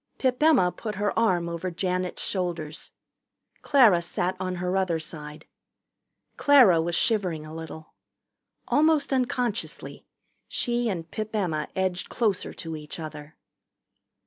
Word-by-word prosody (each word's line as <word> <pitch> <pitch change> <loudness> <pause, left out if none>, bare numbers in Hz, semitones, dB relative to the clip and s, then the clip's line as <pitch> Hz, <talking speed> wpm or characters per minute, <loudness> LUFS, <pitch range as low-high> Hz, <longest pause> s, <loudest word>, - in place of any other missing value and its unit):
Pip 255 0 0
Emma 300 - +5
put 215 +1 -6
her 205 +1 0
arm 185 -7 +2
over 170 +2 -3
Janet's 180 +1 -2
shoulders. 170 -5 -3 0.7
Clara 230 -11 +5
sat 175 +2 -1
on 185 -1 -2
her 180 +1 -2
other 185 -3 +1
side. 150 -1 -7 0.9
Clara 245 - +6
was 170 +1 -1
shivering 180 -8 +1
a 155 - -9
little. 160 -1 -9 0.7
Almost 300 -2 +3
unconsciously 245 -3 -2 0.4
she 240 -1 -1
and 165 -5 -5
Pip 215 +5 -4
Emma 160 -7 -1
edged 185 -1 -1
closer 215 -6 0
to 165 -1 -7
each 150 +2 -8
other. 150 -1 -8
185 Hz, 125 wpm, -26 LUFS, 165-225 Hz, 0.9 s, Clara